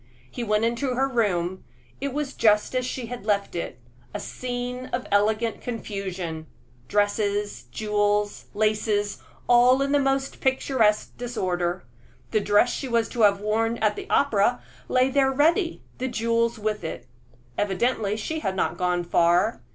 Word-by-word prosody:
He 240 - -4
went 215 0 +1
into 245 +2 -1
her 265 +2 +2
room; 190 -8 0 0.4
it 280 0 -2
was 285 0 -3
just 210 0 +3
as 255 0 0
she 255 -1 -4
had 245 0 -7
left 200 -3 0
it 170 -7 -4 0.4
a - - -2
scene 250 +2 -5
of 250 +1 -3
elegant 215 +3 +1
confusion 190 -8 -5 0.4
dresses, 205 - 0
jewels, 205 - 0
laces, 210 -1 0 0.3
all 245 +2 +6
in 275 - -1
the 290 - +4
most 270 0 -1
picturesque 260 -5 +1
disorder. 185 -7 -2 0.5
The 215 - +3
dress 205 +4 +3
she 270 - -4
was 235 -2 +1
to 240 - -3
have 200 -2 +4
worn 225 +2 0
at 215 -2 +1
the - - -8
opera 245 -3 +2 0.2
lay 255 +1 +2
there 270 0 +3
ready, 330 +6 +2 0.2
the 260 - -1
jewels 230 -1 0
with 215 -2 -2
it. 125 -6 -5 0.5
Evidently 205 - 0
she 315 +9 -3
had 190 -10 -2
not - - -1
gone 180 -1 +1
far. 175 +5 +2
220 Hz, 150 wpm, -25 LUFS, 205-250 Hz, 0.5 s, all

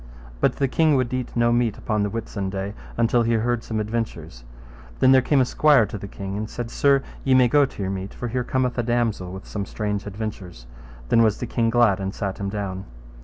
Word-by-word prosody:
But - - +2
the 135 - +1
king 155 +2 +3
would 130 -2 0 0.2
no 120 0 +3
meat 120 0 +3
eat 110 - -6
upon 105 -1 -1
the 105 - 0
Whitsunday, 100 -2 -4 0.2
until 120 +1 +3
he 115 0 +1
heard 115 +1 0
some 110 -1 -3
adventures. 105 - -4 0.5
Then 130 - +5
came 140 +3 +1
there 130 - +5
a - - 0
squire 145 -2 +4
to 105 - -6
the 100 - -7
king 95 0 -6
and 105 +1 -4
said, 120 -1 -5
Sir, 140 -1 +3 0.2
ye 135 -1 +3
may 130 -1 +6
go 145 +4 +4
to 120 - -9
your 95 - -2
meat, 95 0 -5
for 120 - -5
here 125 +2 -1
cometh 125 0 -1
a - - +1
damosel 115 -6 -1
with 95 +1 -8
some 100 -2 -5
strange 105 -1 -3
adventures. 100 - -6 0.4
Then 115 - +5
was 110 -3 +3
the - - -4
king 115 -1 0
glad 115 -4 +3
and 95 0 -4
sat 100 -2 -4
him 100 0 -2
down. 100 -2 -4
110 Hz, 225 wpm, -23 LUFS, 100-120 Hz, 0.5 s, may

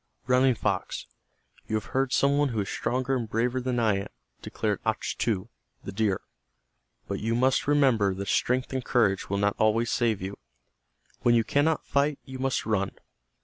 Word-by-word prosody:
"Running 125 0 +4
Fox, - - -2 0.6
you 110 - -1
have 110 - -2
heard 135 -1 +1
some 140 +1 +3
one 145 -1 +2
who 110 -4 -1
is 100 - -4
stronger 130 +1 -1
and 115 -4 -3
braver 125 +4 0
than 125 -1 -1
I 110 -4 +2
am," 100 - -4 0.3
declared - - -2
Achtu, 100 -5 -1 0.4
the - - -6
deer. 100 -1 0 0.9
"But - - -3
you 115 +2 -1
must 130 +3 +2
remember 130 -10 +3
that 100 +1 -5
strength 125 +4 +1
and 130 -1 -2
courage 100 -7 +1
will 100 - 0
not 100 0 +1
always 115 +2 +2
save 115 -4 +1
you. 95 +2 -6 0.8
When 120 -1 +3
you 115 - +4
cannot 145 +6 +1
fight 140 +1 +1
you 130 0 -8
must 135 0 0
run. 100 -3 -1
120 Hz, 175 wpm, -27 LUFS, 105-130 Hz, 0.9 s, Running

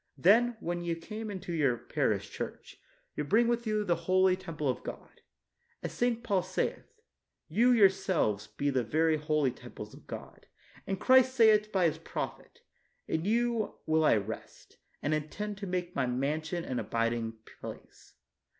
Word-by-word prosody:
Then, 225 - +4
when 175 -3 -3
ye 170 -1 -1
come 215 +6 -6
into 185 -3 -5
your 140 -7 +2
parish - - -1
church, - - -7 0.3
you 150 - -1
bring 220 +10 +3
with 235 -1 0
you 215 -1 +1
the 175 -4 +2
holy 185 0 +5
temple 165 -5 -4
of 130 - 0
God; - - -9 0.6
as - - -4
St. 235 -1 0
Paul 200 -5 +2
saith 185 +1 -2 0.6
''You? 240 +7 +4
your 200 -3 +9
selves 160 - 0
be 140 +7 -1
the 130 -2 +1
very 155 +6 +2
holy 150 -3 +1
temples 120 - -10
of - - -15
God; - - -9 0.4
and 195 -1 -2
Christ 260 0 +5
saith 215 -3 +5
by 185 -3 +2
His 160 -1 +1
prophet, 165 - -6 0.5
"In 160 +2 -1
you 230 0 +1
will 160 0 +3
I 150 - +5
rest, 110 +1 -6 0.3
and 145 - +1
intend 195 +7 -3
to 200 - -5
make 180 -1 -3
My 135 -2 +1
mansion 155 +7 -1
and 125 -2 -2
abiding 115 -1 -1 0.2
place." - - -10
175 Hz, 165 wpm, -31 LUFS, 150-210 Hz, 0.6 s, your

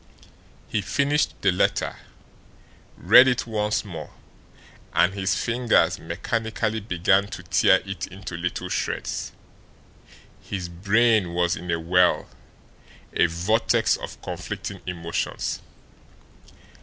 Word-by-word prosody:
He 110 - -1
finished 140 +8 0
the 95 - +4
letter, 90 - 0 1.0
read 130 - +7
it 125 -1 +1
once 105 -2 -1
more 85 -6 -7 0.9
and 95 - +4
his 95 -1 0
fingers 120 0 +2
mechanically 110 -1 -2
began 95 0 +2
to - - -8
tear - - +4
it 95 -2 -5
into 95 -1 -8
little 90 +1 -3
shreds. - - -3 1.1
His 90 -3 -5
brain 100 +1 +2
was 85 0 +2
in 90 - -8
a 85 0 0
whirl, 90 +2 +2 0.9
a - - +4
vortex 90 +8 +1
of - - -8
conflicting - - -6
emotions. 85 -2 -3
95 Hz, 105 wpm, -24 LUFS, 90-110 Hz, 1.1 s, read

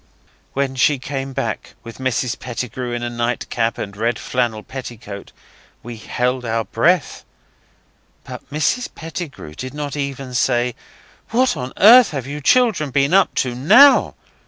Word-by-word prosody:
When 135 -1 -1
she 140 +3 +3
came 135 +1 -5
back, - - -4
with 115 +1 -11
Mrs 125 -2 -1
Pettigrew 125 0 -5
in 120 0 -3
a 120 - -2
nightcap 120 -1 -2
and 100 -1 -6
red 115 +3 -1
flannel 120 -4 -2
petticoat, 120 -6 -9 0.5
we 120 0 -8
held 125 +3 -2
our 115 -1 -1
breath. 165 +10 0 1.0
But - - -10
Mrs 155 - 0
Pettigrew 160 - -7
did 130 - -7
not 145 -1 -4
even 140 -2 -5
say, 125 0 +1 0.6
'What 255 +3 +2
on 125 +1 -5
earth 235 +3 +8
have 135 -6 -5
you 145 +2 -6
children 215 - +3
been 140 +3 +1
up 195 - +4
to 125 -2 0
NOW? 245 - +6
130 Hz, 145 wpm, -19 LUFS, 120-145 Hz, 1.0 s, earth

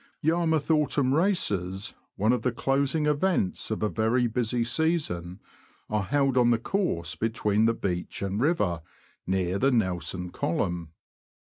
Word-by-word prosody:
Yarmouth 160 -1 +1
Autumn 140 -3 +2
Races, 105 - +1 0.2
one 110 +4 +2
of 125 - 0
the 125 - 0
closing 140 +4 0
events 150 - 0
of 110 -1 -2
a - - +3
very 115 +3 +1
busy 120 +1 0
season, 115 - -1 0.5
are 105 -1 +1
held 135 +4 +1
on 120 -1 +5
the 120 - +4
course 110 - -1
between 110 +1 +1
the 115 - +3
beach 90 -1 -3
and 100 +3 -2
river, 105 - +1 0.5
near 95 0 0
the 135 - +3
Nelson 90 -5 -1
Column. 85 -1 -2
115 Hz, 140 wpm, -27 LUFS, 95-145 Hz, 0.5 s, on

